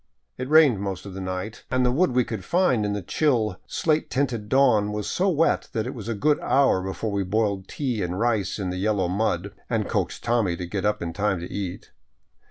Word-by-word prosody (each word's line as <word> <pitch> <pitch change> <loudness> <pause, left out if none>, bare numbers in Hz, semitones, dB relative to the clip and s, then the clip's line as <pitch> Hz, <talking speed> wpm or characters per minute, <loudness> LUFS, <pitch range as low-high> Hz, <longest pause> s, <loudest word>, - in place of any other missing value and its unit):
It 130 +1 -5
rained 150 -9 +6
most 95 -2 -4
of 100 - -8
the 95 - -6
night, 95 +3 -5
and 130 0 +2
the 125 - +3
wood 140 0 +2
we 125 0 +3
could 110 -5 -5
find 145 - +2
in 100 - -1
the 100 -2 -3
chill 110 - +1
slate 155 -1 0
tinted 125 -6 -1
dawn 115 -7 +4
was 105 0 -3
so 190 +2 +1
wet 165 -2 +1
that 110 -4 -1
it 125 - -4
was 115 -4 -8
a 115 - -1
good 150 +8 +2
hour 135 -9 +3
before 95 +3 -3
we 100 0 0
boiled 100 0 -1
tea 125 -7 -2
and 90 +1 -2
rice 110 -5 0
in 95 -3 -3
the 90 - -4
yellow 100 -1 +1
mud 100 0 -1
— - - -36
and 110 -3 0
coaxed 95 -6 -2
Tommy 115 -7 +1
to 90 - -4
get 95 +3 -3
up 105 -3 0
in 85 -1 -4
time 100 -1 0
to 85 - -7
eat. 95 -3 -5
105 Hz, 230 wpm, -25 LUFS, 95-125 Hz, -, rained